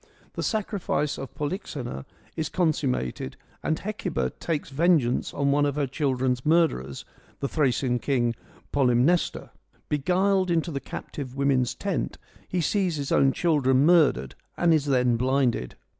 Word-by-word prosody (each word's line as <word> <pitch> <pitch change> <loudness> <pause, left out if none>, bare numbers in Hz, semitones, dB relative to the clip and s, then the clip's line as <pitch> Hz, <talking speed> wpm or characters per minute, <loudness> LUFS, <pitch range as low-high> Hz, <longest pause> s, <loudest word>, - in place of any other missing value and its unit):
The - - -4
sacrifice 200 -8 -1
of 135 - -8
Polyxena 145 - -4 0.3
is 160 -2 -2
consummated 135 - -1 0.2
and 160 - 0
Hecuba 205 -2 -3
takes 155 -4 -3
vengeance 150 -4 +2
on 140 0 0
one 145 +1 +3
of 145 -1 0
her 145 -1 +1
children's 130 -2 -1
murderers, 150 - +1 0.3
the 140 - -1
Thracian 130 -4 +1
king 120 -4 +1 0.4
Polymnestor. 135 +5 +2 0.4
Beguiled 185 +5 +2
into 170 0 +1
the 140 - -2
captive 135 -1 -7
women's 135 -3 +1
tent 200 -3 -3 0.3
he 180 - -1
sees 185 0 +1
his 140 -2 -4
own 135 - +4
children 140 -4 +2
murdered 150 - +4 0.2
and 170 -1 +4
is 155 -3 +2
then 125 -4 +2
blinded. 125 - 0
145 Hz, 135 wpm, -26 LUFS, 130-170 Hz, 0.4 s, own